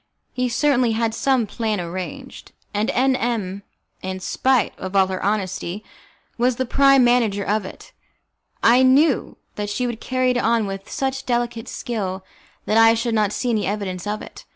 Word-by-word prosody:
He 250 0 -1
certainly 245 -2 +2
had 225 0 0
some 260 -1 +1
plan 215 -1 -2
arranged, 185 +10 -7 0.2
and 210 +2 0
M 260 +1 +2
M, 210 -6 -2 0.4
in 185 0 -4
spite 255 +4 +1
of 185 +1 -6
all 190 -1 +5
her 185 0 -4
honesty, 195 -1 -2 0.6
was 245 +1 +2
the 260 - -1
prime 275 +1 +5
manager 230 -5 +2
of 210 0 0
it. - - -11 0.7
I 240 +3 +6
knew 265 +2 +3 0.2
that 205 -1 -3
she 250 +5 -1
would 235 -2 -4
carry 255 -1 +1
it 250 - 0
on 230 -2 +2
with 195 0 -6
such 270 0 -3
delicate 240 -2 -1
skill 190 -5 -4 0.4
that 215 - +1
I 225 0 +6
should 230 0 -1
not 210 -2 +2
see 245 +3 -1
any 215 -4 0
evidence 195 -2 -3
of 210 +1 -3
it. - - -12
225 Hz, 175 wpm, -21 LUFS, 200-250 Hz, 0.7 s, I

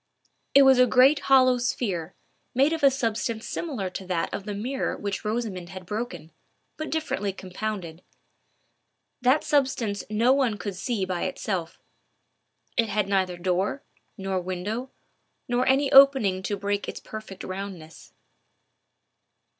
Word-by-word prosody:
It 280 - +9
was 265 -1 +6
a 250 - +6
great 265 +4 +5
hollow 255 -2 +6
sphere, 195 -9 -2 0.4
made 275 +5 +4
of 325 - -3
a 280 - +7
substance 230 -3 -2
similar 265 - -3
to 190 0 -7
that 175 -3 -1
of 200 - -4
the 205 -1 -4
mirror 255 +6 -2
which 200 -1 -4
Rosamond 210 -5 -3
had 185 -1 -9
broken, 180 -6 -5 0.4
but 310 - -5
differently 260 -11 -2
compounded. 185 -3 -6 1.2
That 255 +5 +3
substance 255 -8 0
no 230 +4 +3
one 260 -6 +1
could 200 -2 -5
see 200 +1 -2
by 185 -2 -2
itself. 175 -5 -3 1.0
It 230 -2 +2
had 210 -1 0
neither 190 -3 0
door, 185 +8 -1 0.3
nor 190 -2 -2
window, 195 +8 -4 0.6
nor 245 +1 +1
any 270 +1 +3
opening 265 -9 +6
to 205 - -1
break 200 0 -2
its - - -6
perfect 215 -3 -9
roundness. 185 -4 -8
210 Hz, 140 wpm, -26 LUFS, 190-255 Hz, 1.2 s, It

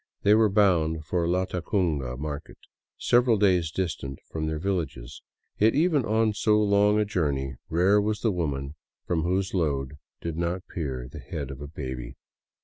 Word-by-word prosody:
They 105 - +6
were 110 0 +5
bound 85 -6 +2
for 85 +1 0
Latacunga 85 - -1
market, 75 +1 -6 0.4
several 120 -2 +3
days 90 -5 +3
distant 75 -6 -3
from 80 -1 -2
their 80 0 -2
villages; 75 -8 -3 0.4
yet 110 +2 +4
even 155 -4 +3
on 110 0 +2
so 105 0 +2
long 105 0 +4
a 105 - +2
journey, 70 -9 -1 0.2
rare 95 +5 +4
was 105 0 -1
the 115 - +2
woman 70 -6 -2 0.3
from 85 -2 0
whose 95 +3 0
load 70 -5 -1 0.2
did 85 -2 -4
not 85 +2 -1
peer 65 -7 -4
the - - -10
head - - -5
of 70 +1 -9
a 75 - -6
baby. 65 -5 -6
85 Hz, 160 wpm, -26 LUFS, 75-100 Hz, 0.4 s, They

